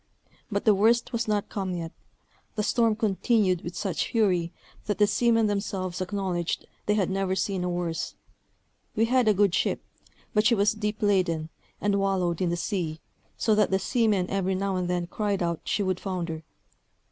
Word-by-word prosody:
But 200 0 -1
the 215 - +7
worst 230 +5 +3
was 230 -1 -1
not 210 -1 0
come 190 -3 -3
yet; 165 -1 -4 0.6
the 210 - 0
storm 230 -1 +2
continued 210 -3 +2
with 175 - -7
such 195 -4 -1
fury, 180 -7 +2 0.4
that 205 - 0
the 210 - +5
seamen 230 +1 +3
themselves 195 -3 -2
acknowledged 185 -2 -2 0.2
they 210 - +3
had 195 -3 +1
never 190 -1 0
seen 190 -1 -1
a 180 - -1
worse. 175 -2 -3 0.8
We 225 - +3
had 250 0 +2
a 215 - +6
good 200 -2 +3
ship, - - 0 0.5
but 210 - +3
she 235 - +4
was 205 0 +3
deep 210 0 -3
laden, 180 -6 +1 0.3
and 200 -1 +1
wallowed 185 -4 0
in 180 - +2
the 175 - -1
sea, 170 -4 -2 0.4
so 220 - +2
that 210 -1 +3
the 190 - +2
seamen 210 -3 +1
every 190 -1 0
now 195 0 -1
and 180 -1 -1
then 175 -1 0
cried 200 +1 -1
out 170 -1 -1
she 205 - 0
would 185 -1 -1
founder. 175 -4 -3
195 Hz, 180 wpm, -27 LUFS, 180-210 Hz, 0.8 s, the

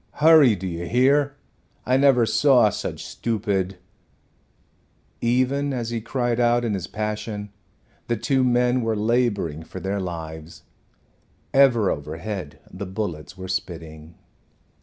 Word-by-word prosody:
Hurry, 150 -7 +6
do 95 0 -7
you 85 -1 -4
hear? 140 - +3 0.5
I 130 - +2
never 135 -3 +4
saw 125 -3 +4
such - - -5
stupid 100 -5 -2 0.7
" - - -43 0.7
Even 130 +4 +1
as 120 -2 -3
he 115 -1 -2
cried 120 +1 -1
out 120 0 +3
in 110 - -1
his 95 -3 -3
passion 105 -1 -4 0.6
the 120 - 0
two 130 +4 +1
men 125 0 +2
were 115 -1 0
laboring 105 -8 0
for 80 +3 -9
their 95 +2 -2
lives. 80 -3 -7 0.9
Ever 125 -7 +4
overhead 80 +2 -5
the 95 +1 -6
bullets 95 -3 -5
were 95 0 -7
spitting. 80 -3 -6
110 Hz, 130 wpm, -23 LUFS, 90-125 Hz, 0.9 s, Hurry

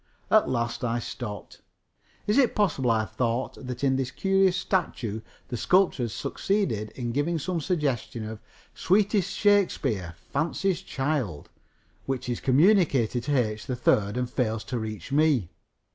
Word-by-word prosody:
At 215 - +5
last 120 -1 -2
I 120 -1 0
stopped. 115 -2 -7 0.6
Is 210 +6 +3
it 255 -4 +3
possible, 160 - +1
I 110 -1 +2
thought, 120 +2 -2
that 125 +1 -5
in 135 -1 +3
this 130 -2 -1
curious 195 +5 +2
statue 115 - -1 0.3
the 120 - -3
sculptor 180 - +3
has 115 - -5
succeeded 120 - -1
in 120 -2 -3
giving 145 +7 0
some 170 +2 -2
suggestion 140 - -1
of 110 0 -6 0.3
"sweetest 200 +1 +2
Shakespeare, 135 - +1 0.2
fancy's 170 +5 0
child," 135 - -2 0.6
which 130 -2 -2
is 120 - -2
communicated 140 - +3
to 145 0 +1
H. 110 -3 -1
3rd 110 -4 +1
and 125 0 0
fails 115 -3 -1
to 120 +2 -3
reach 110 +3 -6
me? 140 - +2
130 Hz, 145 wpm, -26 LUFS, 115-175 Hz, 0.6 s, At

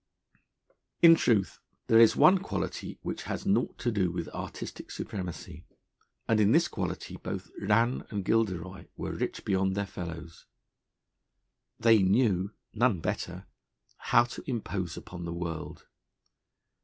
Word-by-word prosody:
In 165 -1 +10
truth, 110 - +2 0.3
there 115 - +5
is 115 -1 +7
one 180 +6 +6
quality 195 - -4
which - - -4
has - - -4
naught 200 +1 +1
to 120 - -1
do 95 -5 +1
with 85 -1 -4
artistic - - -7
supremacy; 90 -4 -6 0.6
and 110 -1 +3
in 105 +1 +4
this 165 +3 +4
quality - - -4
both - - -6
Rann 115 +5 +1
and 100 -4 -4
Gilderoy 95 -7 -1
were - - -4
rich - - -4
beyond 95 0 +1
their 100 0 -1
fellows. 85 -3 -8 1.3
They 115 -2 +5
knew 95 -1 +2 0.2
(none 115 -4 +2
better) - - -4 0.5
how 120 - +4
to 120 +1 -8
impose 100 -8 -3
upon 90 -1 -8
the 85 - -4
world. 85 -2 -5
100 Hz, 130 wpm, -29 LUFS, 90-115 Hz, 1.3 s, In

